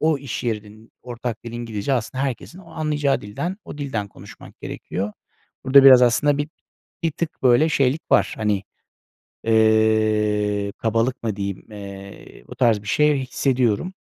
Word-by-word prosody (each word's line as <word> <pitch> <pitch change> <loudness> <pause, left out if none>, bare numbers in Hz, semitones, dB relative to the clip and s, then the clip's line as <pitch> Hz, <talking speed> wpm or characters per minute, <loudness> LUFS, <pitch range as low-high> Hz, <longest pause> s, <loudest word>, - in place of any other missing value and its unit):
o 155 -2 +2
iş 130 -2 -6
yerinin 110 -1 -5
ortak 120 -2 -6
dili 115 0 -7
İngilizce, 115 0 -3
aslında 130 +2 -1
herkesin 140 +6 -5
o 185 - -15
anlayacağı 150 -3 0
dilden, 170 - -5
o 150 - -9
dilden 115 -8 -3
konuşmak - - -14
gerekiyor. 100 +3 -5 0.5
Burada 135 +1 +7
biraz 130 -2 +9
aslında 140 +4 +3
bi 145 +1 -2 0.5
bir 165 - +1
tık 165 0 -5
böyle 130 +5 +5
şeylik 140 +1 +1
var. - - +3
Hani, 105 -2 0 0.8
eee, 110 -2 +2
kabalık 115 +3 -1
mı 110 -3 -2
diyeyim? 100 -1 -5
Eee, 100 -1 -11
o - - -10
tarz 115 -5 +2
bir 105 - -12
şey 150 +3 +3
hissediyorum. 130 - 0
120 Hz, 150 wpm, -22 LUFS, 105-140 Hz, 0.8 s, biraz